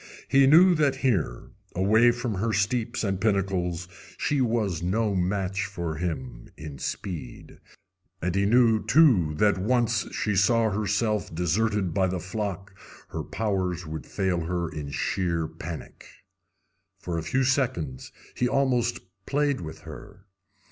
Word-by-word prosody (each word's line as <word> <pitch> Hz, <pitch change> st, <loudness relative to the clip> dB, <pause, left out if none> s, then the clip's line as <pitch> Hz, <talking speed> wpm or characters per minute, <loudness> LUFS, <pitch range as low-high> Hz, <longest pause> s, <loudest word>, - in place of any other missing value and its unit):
He 135 Hz, 0 st, +5 dB
knew 175 Hz, +6 st, +7 dB
that 145 Hz, -4 st, +2 dB
here, 90 Hz, -, 0 dB, 0.2 s
away 110 Hz, +6 st, +4 dB
from 120 Hz, -1 st, -1 dB
her 110 Hz, +4 st, -1 dB
steeps 115 Hz, +4 st, 0 dB
and 95 Hz, -2 st, -1 dB
pinnacles, 95 Hz, -4 st, 0 dB, 0.3 s
she 145 Hz, -2 st, 0 dB
was 110 Hz, -8 st, 0 dB
no 105 Hz, +4 st, 0 dB
match 95 Hz, 0 st, -1 dB
for 85 Hz, -5 st, -4 dB
him 65 Hz, -8 st, -5 dB
in 75 Hz, -3 st, -8 dB
speed, 85 Hz, -10 st, -6 dB, 0.6 s
and 90 Hz, +1 st, -1 dB
he 100 Hz, +1 st, +2 dB
knew, 115 Hz, -1 st, +4 dB
too, 115 Hz, -, +4 dB
that 100 Hz, +3 st, +2 dB
once 115 Hz, +2 st, +1 dB
she 105 Hz, -2 st, -1 dB
saw 110 Hz, +3 st, +3 dB
herself 105 Hz, +1 st, 0 dB
deserted 95 Hz, +2 st, 0 dB
by 95 Hz, +1 st, +2 dB
the 90 Hz, 0 st, -2 dB
flock 95 Hz, 0 st, -5 dB, 0.4 s
her -, -, -4 dB
powers 95 Hz, -5 st, -2 dB
would 80 Hz, -3 st, -7 dB
fail 95 Hz, -3 st, -1 dB
her 85 Hz, 0 st, -1 dB
in 75 Hz, -3 st, -6 dB
sheer 85 Hz, +1 st, -1 dB
panic. 80 Hz, 0 st, -9 dB, 0.9 s
For 85 Hz, -3 st, -3 dB
a -, -, -5 dB
few 130 Hz, +8 st, 0 dB
seconds 125 Hz, -, -1 dB, 0.2 s
he 125 Hz, -, +1 dB
almost 125 Hz, -3 st, +1 dB, 0.3 s
played 145 Hz, -4 st, +1 dB
with 80 Hz, -1 st, -8 dB
her. 95 Hz, +5 st, -12 dB
100 Hz, 140 wpm, -26 LUFS, 85-115 Hz, 0.9 s, knew